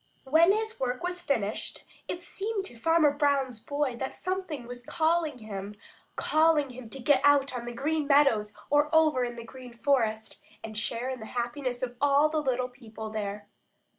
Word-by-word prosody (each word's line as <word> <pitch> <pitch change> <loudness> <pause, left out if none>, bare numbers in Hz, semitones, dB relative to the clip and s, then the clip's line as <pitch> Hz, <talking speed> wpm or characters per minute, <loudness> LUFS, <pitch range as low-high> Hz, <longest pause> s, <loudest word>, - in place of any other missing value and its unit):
When 320 +7 +5
his 440 +2 -1
work 250 +1 -2
was 360 0 -3
finished, 225 -10 -2 0.2
it 350 0 -5
seemed 400 +3 -3
to 315 - -7
Farmer 315 +4 +4
Brown's 280 -5 +1
boy 280 +1 -2
that 265 +2 -4
something 365 -8 -3
was 245 0 -8
calling 320 -1 +1
him, 205 -2 -7 0.4
calling 310 -3 +3
him 245 -2 -10
to 270 - -7
get 265 +1 +3
out 280 -2 +4
on 240 -1 -4
the 240 - -4
Green 295 +5 -1
Meadows 275 -8 +4 0.2
or 295 +1 +4
over 310 -5 +4
in 240 -1 -3
the 235 - -7
Green 250 +1 -11
Forest 225 -4 0 0.2
and 220 -1 -7
share 235 +4 -1
in 260 - -5
the 220 - -8
happiness 245 +1 -2
of 245 -1 -4
all 285 +1 +4
the 310 0 0
little 255 -3 0
people 225 -4 -9
there. 205 -1 -4
265 Hz, 180 wpm, -28 LUFS, 235-305 Hz, 0.4 s, When